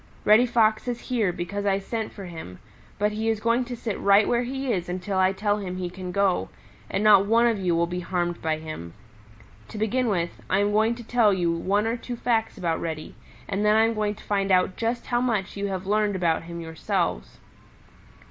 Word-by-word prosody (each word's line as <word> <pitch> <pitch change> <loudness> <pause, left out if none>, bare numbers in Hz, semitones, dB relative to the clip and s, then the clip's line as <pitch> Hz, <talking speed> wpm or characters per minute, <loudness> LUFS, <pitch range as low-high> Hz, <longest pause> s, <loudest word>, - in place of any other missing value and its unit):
Reddy 220 +4 +6
Fox 220 -1 +2
is 240 -1 -2
here 230 -7 0
because 180 +4 -4
I 195 -1 +3
sent 220 +3 -4
for 200 - -9
him, 160 - -9 0.4
but 210 +1 +1
he 220 +1 -1
is 220 -1 0
going 235 +3 +1
to 245 0 -5
sit 225 -3 -4
right 200 +1 +5
where 240 0 +2
he 265 0 -2
is 180 -3 -3
until 185 +2 -2
I 185 0 +4
tell 205 +1 0
him 185 -3 -5
he 180 -1 -4
can 180 0 -6
go, 195 -1 +1 0.4
and 200 - -1
not 200 -2 +6
one 230 +2 +4
of 230 -3 +2
you 180 -3 +1
will 170 +1 +2
be 180 +1 -4
harmed 175 -1 -2
by 160 -1 0
him. 155 - -8 0.7
To 220 - -9
begin 235 +4 0
with, 170 -5 -2
I 190 - +3
am 205 +1 +2
going 220 +3 +2
to 240 - -9
tell 230 -2 +3
you 175 -3 +1
one 195 +5 0
or 230 +2 -1
two 245 +1 -6
facts 230 -1 0
about 170 -4 -1
Reddy, 160 -2 -5 0.3
and 200 +1 -1
then 210 0 +4
I 220 - +5
am 225 - +1
going 210 -1 -1
to - - -15
find 195 -1 0
out 185 0 +3
just 235 +1 -2
how 240 0 0
much 220 -7 -1
you 200 0 -2
have 190 -1 -4
learned 210 0 +1
about 170 -3 0
him 170 0 -7
yourselves. 160 - -2
200 Hz, 225 wpm, -25 LUFS, 180-225 Hz, 0.7 s, Reddy